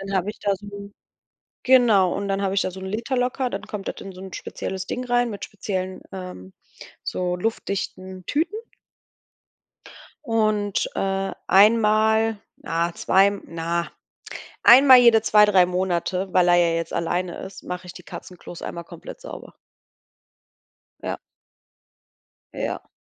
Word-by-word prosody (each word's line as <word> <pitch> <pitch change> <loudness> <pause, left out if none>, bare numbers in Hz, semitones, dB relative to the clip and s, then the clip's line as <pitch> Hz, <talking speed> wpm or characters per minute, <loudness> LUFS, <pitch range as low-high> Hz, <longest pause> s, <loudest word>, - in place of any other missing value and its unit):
Und 195 - -8
dann 195 - 0
habe 190 +2 0
ich - - -13
da 200 -1 +1
so 200 0 -10 0.7
genau, 230 -8 +5
und 200 - -3
dann 195 0 -1
habe 195 -1 0
ich 195 - +2
da 185 - -2
so 190 - -10
'n 190 - -6
Liter 230 +6 -3
locker, 250 +1 0
dann - - -4
kommt 205 -2 -6
das - - -6
in 195 - -8
so 185 - -12
'n 190 -2 -9
spezielles 190 -1 -5
Ding 250 - -4
rein 245 0 +1
mit 205 - -6
speziellen 190 -2 -5
ähm, 180 - -8 0.5
so 180 -1 -2
luftdichten 190 -2 -4
Tüten. 335 +8 -1 1.7
Und, 215 -4 0
äh, 195 0 -1
einmal 220 +1 +4 0.2
na, 170 +1 -2
zwei 195 +1 +4
na 170 +1 -3 0.7
einmal 260 +1 +9
jede 235 -3 +6
2, 210 -1 +6
3 190 -4 +5
Monate, 180 +1 -1
weil 180 -1 +4
er 175 - +6
ja 170 -1 +3
jetzt 165 0 -3
alleine 175 +1 -2
ist, 190 - -9
mache 180 0 -6
ich 175 - -8
die 180 - -11
Katzenklos 175 -1 -10
einmal 170 -1 -6
komplett - - -11
sauber. - - -10 1.5
Ja. - - -3 1.4
Ja. - - -4
195 Hz, 150 wpm, -23 LUFS, 180-220 Hz, 1.7 s, einmal